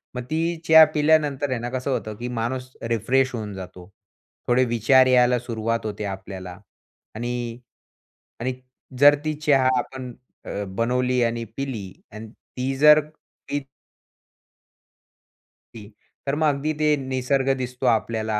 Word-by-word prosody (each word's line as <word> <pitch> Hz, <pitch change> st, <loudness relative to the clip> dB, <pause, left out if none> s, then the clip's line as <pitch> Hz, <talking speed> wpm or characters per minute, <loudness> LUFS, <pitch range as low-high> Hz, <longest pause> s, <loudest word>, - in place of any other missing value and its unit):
मग 125 Hz, -, -4 dB
ती 165 Hz, +2 st, 0 dB
चहा 160 Hz, 0 st, +9 dB
पिल्यानंतर 150 Hz, -2 st, +2 dB
आहे 125 Hz, -, -1 dB
ना, 120 Hz, +1 st, -4 dB
कसं 130 Hz, +2 st, -3 dB
होतं, 110 Hz, -4 st, -3 dB
की 120 Hz, -, -5 dB
माणूस 130 Hz, +2 st, -3 dB
रिफ्रेश 125 Hz, +3 st, +1 dB
होऊन 105 Hz, -3 st, -5 dB
जातो. 90 Hz, -1 st, -10 dB, 0.6 s
थोडे 125 Hz, +1 st, +3 dB
विचार 125 Hz, +3 st, +4 dB
यायला 125 Hz, -1 st, +4 dB
सुरुवात 115 Hz, -1 st, -3 dB
होते 105 Hz, 0 st, -4 dB
आपल्याला 95 Hz, -2 st, -7 dB, 0.6 s
आणि 120 Hz, 0 st, -4 dB, 0.8 s
आणि 130 Hz, +2 st, -2 dB, 0.5 s
जर 145 Hz, +1 st, +8 dB
ती 155 Hz, -, 0 dB
चहा 135 Hz, -3 st, +4 dB
आपण 125 Hz, 0 st, -5 dB, 0.3 s
अ, 100 Hz, -, -4 dB
बनवली 125 Hz, +1 st, +1 dB
आणि 115 Hz, 0 st, -1 dB
पिली 115 Hz, -9 st, -4 dB, 0.2 s
आणि 110 Hz, +1 st, -9 dB
ती 130 Hz, +2 st, -5 dB
जर 150 Hz, +1 st, +7 dB, 0.5 s
पित 145 Hz, -1 st, -2 dB, 2.1 s
ती, 105 Hz, -2 st, -10 dB, 0.4 s
तर 140 Hz, +1 st, 0 dB
मग 155 Hz, -, +4 dB
अगदी 155 Hz, +3 st, -2 dB
ते 155 Hz, -, +3 dB, 0.2 s
निसर्ग 130 Hz, +1 st, 0 dB
दिसतो 125 Hz, +1 st, -5 dB
आपल्याला 110 Hz, 0 st, -1 dB
125 Hz, 135 wpm, -23 LUFS, 115-135 Hz, 2.1 s, चहा